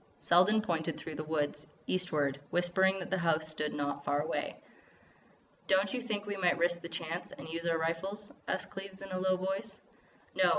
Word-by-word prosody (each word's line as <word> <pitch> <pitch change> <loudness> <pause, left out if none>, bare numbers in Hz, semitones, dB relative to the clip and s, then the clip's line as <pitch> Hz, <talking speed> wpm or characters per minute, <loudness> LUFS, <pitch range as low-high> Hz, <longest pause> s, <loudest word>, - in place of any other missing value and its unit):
Selden 205 +5 +5
pointed 165 -4 -1
through 160 - -6
the 155 - -4
woods, 150 -1 -1 0.2
eastward, 150 -7 +1
whispering 190 +2 +3
that 185 - -6
the 190 - +2
house 160 -2 +2
stood 155 -1 0
there - - -5
not 145 0 -2
far 145 0 +1
away. - - -2 1.1
"Don't 190 +1 +3
you 250 - -1
think 210 -4 -2
we 205 -1 -3
might 180 -2 +3
risk 175 0 +2
the 170 - -6
chance 165 +1 -4
and - - -9
use 165 +1 -3
our 165 -1 +3
rifles?" 190 +6 -2
asked 185 - -2
Cleves 195 0 -7
in 195 - -8
a 185 - -1
low 185 0 +2
voice. 190 +1 -3 0.5
"No. - - +4
175 Hz, 195 wpm, -33 LUFS, 160-190 Hz, 1.1 s, Selden